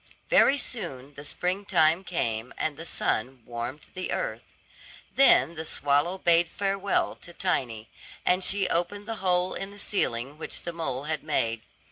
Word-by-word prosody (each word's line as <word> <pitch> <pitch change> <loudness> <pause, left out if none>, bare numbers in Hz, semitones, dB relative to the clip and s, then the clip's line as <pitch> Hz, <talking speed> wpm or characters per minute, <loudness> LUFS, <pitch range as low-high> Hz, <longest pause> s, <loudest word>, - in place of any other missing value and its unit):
Very 275 - +6
soon 145 - -4
the 145 - -10
spring 180 +6 -2
time 165 -2 +4
came, 115 -10 -2
and 155 -2 -1
the 165 +3 -7
sun 125 +2 -1
warmed 120 +5 -5
the 185 - -4
earth. - - -4 0.6
Then 170 - +6
the 160 -1 -5
swallow 145 +4 +2
bade 170 -2 +3
farewell 195 0 0
to 175 - -13
Tiny, 120 - -1 0.4
and 185 +1 +3
she 195 0 +3
opened 200 +5 -1
the 225 -1 -4
hole 180 -1 +1
in 195 - -5
the 205 - -13
ceiling 140 - -1
which - - -4
the 175 - -4
mole 145 -6 -3
had 155 0 -2
made. 115 -7 0
165 Hz, 160 wpm, -27 LUFS, 135-190 Hz, 0.6 s, Very